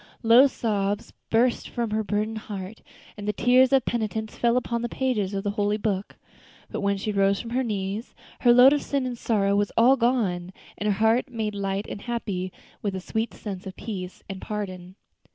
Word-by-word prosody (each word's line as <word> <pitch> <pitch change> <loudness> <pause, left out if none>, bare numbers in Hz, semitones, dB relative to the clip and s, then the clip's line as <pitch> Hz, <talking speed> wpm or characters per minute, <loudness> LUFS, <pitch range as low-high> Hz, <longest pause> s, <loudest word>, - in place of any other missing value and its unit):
Low 235 +4 +7
sobs 205 -5 -2 0.2
burst 235 +2 +2
from 235 -3 -2
her 220 +1 0
burdened 215 +1 -1
heart, 195 +1 -6 0.3
and 205 -1 -7
the 210 - +1
tears 250 +3 +4
of 270 -3 +4
penitence 220 -1 -2
fell 235 0 +2
upon 235 -1 -1
the 240 - -2
pages 215 -8 -1
of 195 - -2
the 205 - 0
holy 205 0 0
book. 205 -2 -2 0.6
But - - -3
when 200 0 +1
she 210 +2 -2
rose 195 -1 +2
from 235 - -7
her 255 +2 +1
knees, 210 -1 -3 0.2
her 240 - +5
load 250 +3 +8
of 290 - +1
sin 280 -2 -1
and 250 -1 -3
sorrow 200 -4 +1
was 205 0 +1
all 250 +4 +6
gone, 205 -8 0 0.2
and 210 - -3
her 200 - +2
heart 225 +6 +2
made 220 -3 -3
light 200 0 -2
and 200 - -6
happy 205 -6 -3 0.3
with 200 -2 -2
a - - -2
sweet 220 +4 -2
sense 195 -2 -6
of 190 - -7
peace 185 -4 -6
and 195 -1 -7
pardon. 185 -3 -5
215 Hz, 200 wpm, -25 LUFS, 200-235 Hz, 0.6 s, load